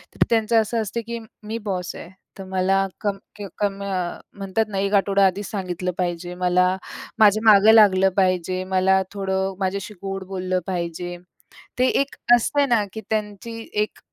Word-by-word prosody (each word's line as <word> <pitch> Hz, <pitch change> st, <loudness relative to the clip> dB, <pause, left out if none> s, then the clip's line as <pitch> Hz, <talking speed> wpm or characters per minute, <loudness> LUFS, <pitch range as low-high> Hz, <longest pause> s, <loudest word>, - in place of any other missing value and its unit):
तर -, -, +3 dB
त्यांचं 225 Hz, 0 st, +3 dB
असं 225 Hz, +1 st, -1 dB
असतं 220 Hz, +2 st, -3 dB
की 235 Hz, 0 st, -4 dB, 0.2 s
"मी 220 Hz, +2 st, -4 dB
बॉस 180 Hz, -2 st, -3 dB
आहे. 175 Hz, -, -9 dB, 0.3 s
तर 195 Hz, -, -7 dB
मला 190 Hz, +1 st, +2 dB, 0.2 s
कम 200 Hz, -2 st, -1 dB, 0.2 s
की 205 Hz, -1 st, -7 dB
कमी" 200 Hz, -1 st, -2 dB
अ, 185 Hz, -3 st, -3 dB, 0.2 s
म्हणतात 195 Hz, +3 st, -1 dB
ना, 195 Hz, -, -4 dB
"1 200 Hz, +1 st, -1 dB
आठवडा 195 Hz, 0 st, +3 dB
आधीच 190 Hz, +2 st, -1 dB
सांगितलं 185 Hz, -2 st, -3 dB
पाहिजे. 175 Hz, 0 st, -3 dB
मला, 180 Hz, +1 st, +2 dB, 0.4 s
माझ्या 215 Hz, 0 st, +5 dB
मागं 210 Hz, +2 st, +7 dB
लागलं 195 Hz, -3 st, +6 dB
पाहिजे, 185 Hz, -1 st, +1 dB
मला 190 Hz, 0 st, +2 dB
थोडं 190 Hz, -1 st, -1 dB
माझ्याशी 195 Hz, +2 st, -2 dB
गोड 195 Hz, -1 st, -4 dB
बोललं 185 Hz, -1 st, -2 dB
पाहिजे." 175 Hz, -1 st, -4 dB, 0.6 s
ते 255 Hz, -, +4 dB
एक 275 Hz, -, -2 dB, 0.2 s
असतं 280 Hz, +4 st, +1 dB
ना, 225 Hz, -4 st, +3 dB
की 220 Hz, -, -6 dB
त्यांची 215 Hz, +1 st, -3 dB, 0.2 s
एक 210 Hz, -, -5 dB
195 Hz, 165 wpm, -22 LUFS, 185-210 Hz, 0.6 s, मागं